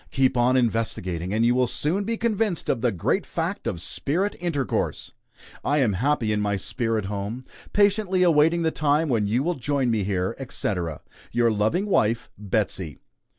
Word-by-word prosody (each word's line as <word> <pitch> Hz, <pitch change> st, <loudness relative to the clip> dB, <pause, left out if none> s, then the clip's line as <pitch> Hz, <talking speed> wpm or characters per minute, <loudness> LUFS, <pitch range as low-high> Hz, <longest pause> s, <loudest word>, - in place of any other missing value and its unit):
Keep 130 Hz, -1 st, +2 dB
on 125 Hz, +1 st, +3 dB
investigating, 95 Hz, -7 st, -1 dB
and 110 Hz, +2 st, +2 dB
you 120 Hz, -, +4 dB
will 125 Hz, 0 st, +2 dB
soon 175 Hz, -, -1 dB
be 230 Hz, +1 st, -1 dB
convinced 215 Hz, -5 st, 0 dB
of 115 Hz, -, +1 dB
the 120 Hz, -1 st, +2 dB
great 90 Hz, -5 st, 0 dB
fact -, -, -3 dB
of 85 Hz, -, -2 dB
spirit 175 Hz, -, -1 dB
intercourse. 145 Hz, -, -2 dB, 0.5 s
I 145 Hz, -, +1 dB
am 125 Hz, -8 st, +3 dB
happy 120 Hz, +1 st, +1 dB
in 105 Hz, -1 st, +1 dB
my 100 Hz, -1 st, 0 dB
spirit 115 Hz, +1 st, -2 dB
home; 105 Hz, +5 st, -4 dB, 0.3 s
patiently 200 Hz, -2 st, +3 dB
awaiting 165 Hz, 0 st, +4 dB
the 160 Hz, -, +2 dB
time 150 Hz, +1 st, +1 dB
when 110 Hz, -5 st, +1 dB
you 120 Hz, +6 st, +1 dB
will 175 Hz, +3 st, +1 dB
join 135 Hz, -3 st, 0 dB
me 110 Hz, -3 st, +1 dB
here, 95 Hz, +2 st, -1 dB
etc. 90 Hz, -, -3 dB, 0.3 s
Your 120 Hz, -1 st, +3 dB
loving 110 Hz, -, +1 dB
wife, 115 Hz, -, +1 dB
BETSEY." 95 Hz, -, -2 dB
120 Hz, 170 wpm, -25 LUFS, 105-160 Hz, 0.5 s, you